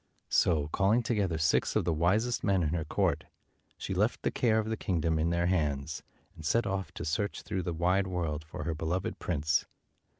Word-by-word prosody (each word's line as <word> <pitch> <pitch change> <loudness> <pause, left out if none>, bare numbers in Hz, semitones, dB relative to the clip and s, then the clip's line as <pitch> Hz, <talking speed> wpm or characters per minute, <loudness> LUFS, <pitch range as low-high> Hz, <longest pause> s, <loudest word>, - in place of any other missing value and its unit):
So, 80 -5 +3
calling 105 +8 +2
together 100 -8 0
six 80 -1 +2
of - - +2
the 85 - +2
wisest 105 +10 +1
men 95 -4 +2
in 75 - +1
her 80 0 -1
court, - - 0 0.5
she - - -4
left - - 0
the - - +1
care 115 -3 +2
of 110 -1 0
the 110 - -1
kingdom 80 -5 0
in 80 +2 +1
their 85 0 +1
hands, 75 -4 0 0.3
and 80 - -11
set 115 +10 +2
off 95 -5 -2
to - - -5
search 85 +6 -2
through 95 - -2
the 85 - -3
wide 90 +4 +1
world 80 -4 -2
for 80 - -7
her 85 - -1
beloved 80 +3 -2
prince. 80 -1 0
85 Hz, 200 wpm, -30 LUFS, 80-95 Hz, 0.5 s, So